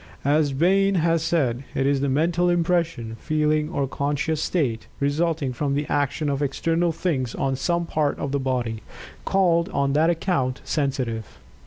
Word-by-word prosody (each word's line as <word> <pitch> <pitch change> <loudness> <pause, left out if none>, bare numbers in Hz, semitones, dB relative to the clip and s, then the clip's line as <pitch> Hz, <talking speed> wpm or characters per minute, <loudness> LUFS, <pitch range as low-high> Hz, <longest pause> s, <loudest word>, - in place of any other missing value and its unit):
As 145 0 +3
Bain 195 +7 +3
has 165 -1 +2
said, 140 -7 0
it 135 - +1
is 140 -1 +2
the 140 - +1
"mental 170 +5 +2
impression, 170 -9 0
feeling, 155 0 +1
or 145 -5 -1
conscious 145 +3 -1
state, 130 -11 -1
resulting 145 -1 0
from 140 +2 -1
the 145 +1 -1
action 145 +2 0
of 140 0 -1
external 165 +4 0
things 145 -8 -2
on 135 -1 0
some 170 +6 0
part 155 -3 0
of 140 - -3
the 140 - 0
body, 125 -4 -2 0.4
called 175 -2 +2
on 140 -7 0
that 155 +3 +3
account, 165 -7 0
sensitive." 130 -7 -2
150 Hz, 160 wpm, -24 LUFS, 135-165 Hz, 0.4 s, As